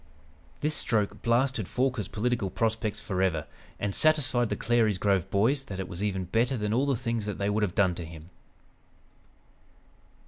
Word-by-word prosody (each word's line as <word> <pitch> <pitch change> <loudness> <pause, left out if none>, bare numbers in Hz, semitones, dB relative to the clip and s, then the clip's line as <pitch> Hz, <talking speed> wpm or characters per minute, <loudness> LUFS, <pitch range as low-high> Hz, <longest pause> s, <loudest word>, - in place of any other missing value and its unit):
This 150 +1 +1
stroke 105 -7 0
blasted 120 -3 +1
Forquer's 125 -6 -1
political 115 -2 -1
prospects 110 +1 -1
forever, 90 -5 -1 0.3
and 100 -1 -1
satisfied 140 -6 +3
the - - -1
Clary's 110 -4 +2
Grove 95 -1 +1
Boys 130 +9 +2
that 95 -1 -6
it 95 - -3
was 85 +2 -5
even 95 -3 -1
better 120 +7 +1
than 105 -1 -1
all 130 +4 +2
the 140 - +2
things 115 -2 -2
they 100 0 -1
would 105 +1 0
have 100 -4 -1
done 95 -3 +3
to 85 -1 -6
him. 80 +1 -11
105 Hz, 165 wpm, -28 LUFS, 95-120 Hz, 0.3 s, satisfied